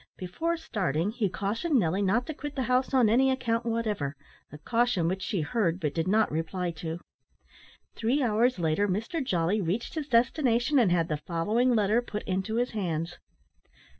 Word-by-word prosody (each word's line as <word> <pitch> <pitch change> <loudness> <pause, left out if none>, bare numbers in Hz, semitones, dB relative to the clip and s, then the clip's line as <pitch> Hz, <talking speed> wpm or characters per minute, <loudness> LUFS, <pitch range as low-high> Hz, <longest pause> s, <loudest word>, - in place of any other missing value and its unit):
Before 325 - -2
starting, 195 - -1
he 220 -4 -1
cautioned 225 - -1
Nelly 185 -2 +1
not 210 +6 +1
to 315 - -5
quit 290 0 -7
the 265 - -1
house 255 +1 +1
on 255 -4 +4
any 255 +5 +4
account 235 -3 -1
whatever, 210 -11 -1 0.4
a 150 - -9
caution 230 +1 +1
which 185 +2 -2
she 190 -2 -1
heard 170 +1 0
but 150 -5 -2
did 165 +1 -1
not 215 +3 +3
reply 170 +3 -2
to. 165 +1 -4 0.9
Three 250 +6 0
hours 235 +1 +2
later 170 +4 +1
Mr 225 - -2
Jolly 185 -2 0
reached 190 +7 -2
his 310 -3 -4
destination, 245 +2 +2
and 215 -7 +3
had 170 -2 +2
the 155 - -1
following 220 +9 +1
letter 215 +2 +3
put 210 -3 -6
into 190 +4 -2
his 245 +1 0
hands. 175 -5 -3
215 Hz, 175 wpm, -28 LUFS, 175-245 Hz, 0.9 s, on